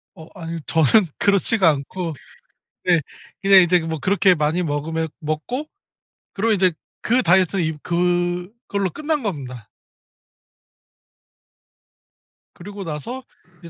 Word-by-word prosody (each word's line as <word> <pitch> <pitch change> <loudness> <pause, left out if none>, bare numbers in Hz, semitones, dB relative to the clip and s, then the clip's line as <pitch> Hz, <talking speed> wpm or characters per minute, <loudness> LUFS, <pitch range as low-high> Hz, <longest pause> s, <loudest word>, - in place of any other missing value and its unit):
어 160 - -12
아니요. 165 0 -5
저는 165 - +4
그렇지가 200 -1 +4
않고. 160 +4 -3 0.7
네 175 -3 +3 0.4
그냥 195 -1 +7
이제 180 0 +3
뭐 160 -2 -4
그렇게 190 +1 +3
많이 155 +3 0
먹으면 160 +1 -2
먹고 160 - -3 0.7
그리고 225 +3 0
이제 185 -2 +3 0.3
그 245 +3 +2
다이어트는 185 +1 +3
임 160 -1 -2
그걸로 180 +4 -1
끝난 300 - -2
겁니다. 130 - -6 2.9
그리고 200 +3 -9
나서 190 - -6 0.4
이제 170 - -12
175 Hz, 240 characters per minute, -21 LUFS, 160-200 Hz, 2.9 s, 그냥